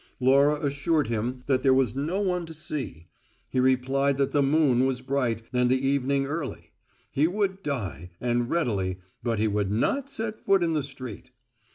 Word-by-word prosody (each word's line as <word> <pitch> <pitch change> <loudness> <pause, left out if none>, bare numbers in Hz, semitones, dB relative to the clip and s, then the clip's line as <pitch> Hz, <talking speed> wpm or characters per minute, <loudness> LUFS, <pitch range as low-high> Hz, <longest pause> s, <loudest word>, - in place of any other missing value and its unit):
Laura 140 +3 +4
assured 145 -1 +1
him 120 +3 -2
that 130 -2 +2
there 130 -1 +4
was 130 -4 +2
no 155 +8 -1
one 180 -3 0
to 165 -1 -9
see; 145 - -5 0.5
he 130 - +1
replied 130 +2 +2
that 140 -1 +1
the 145 - +3
moon 140 -3 +3
was 130 -2 -1
bright 125 -4 -1
and 125 0 +3
the 130 +1 +2
evening 140 0 +1
early; 145 -1 -5 0.4
he 150 +3 +3
would 195 +1 -1
die, 95 - -4
and 120 0 0
readily, 100 - 0 0.2
but 115 -2 -1
he 110 +1 +2
would 105 -2 0
not 255 - 0
set 220 -4 -4
foot 195 -2 +3
in 165 -1 +1
the 155 - +1
street. 130 - -8
135 Hz, 180 wpm, -26 LUFS, 125-150 Hz, 0.5 s, Laura